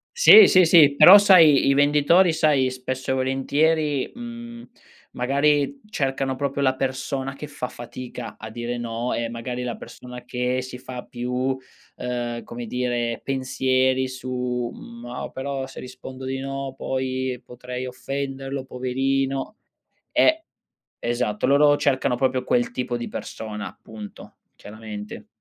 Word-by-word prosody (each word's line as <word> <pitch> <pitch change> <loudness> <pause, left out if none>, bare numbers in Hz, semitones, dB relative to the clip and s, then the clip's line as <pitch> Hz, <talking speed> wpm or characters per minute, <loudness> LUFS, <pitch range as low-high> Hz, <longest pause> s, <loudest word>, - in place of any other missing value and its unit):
Sì, 440 -3 +9
sì, 185 -2 +6
sì. 155 -4 +6
Però 185 +6 +10
sai, 170 -10 +6
i 140 - +5
venditori, 150 +5 +4
sai, 150 -5 +2
spesso 130 +1 -4
e - - +2
volentieri, 140 +2 0
mhmm, 235 0 -9 0.4
magari, 145 - +1
cercano 135 -5 -1
proprio 140 +1 -2
la 130 -1 +2
persona 135 +1 -3
che 145 +2 -8
fa 140 -3 -6
fatica 120 -1 -8
a 110 - -8
dire 120 +2 -4
no, 120 +1 -3
e 115 0 -2
magari, 120 +2 -5
la 120 -2 -4
persona 125 +1 -11
che 125 +1 -1
si 125 0 -8
fa 125 -1 -8
più, 125 +2 -2 0.4
uhm, 120 -1 -4
come 120 0 -7
dire, 120 -1 -2
pensieri 130 -1 0
su: 125 -1 -3
"Mo' 120 +1 -8
però 135 0 -4
se - - -11
rispondo 130 +1 -9
di 135 0 -3
no, 135 0 -5
poi, 130 -1 -3
potrei 125 +1 -7
offenderlo. 135 +1 -5
Poverino." 135 - -2 0.6
Eh, 320 +1 +3 0.5
esatto, 120 -3 -1
loro 145 +1 +5
cercano 135 -3 +1
proprio 130 0 0
quel 120 0 0
tipo 125 -1 -3
di 120 - -5
persona, 105 -2 -7
punto, 105 -2 -11 0.2
chiaramente. 105 -1 -9
130 Hz, 135 wpm, -23 LUFS, 125-140 Hz, 0.6 s, Però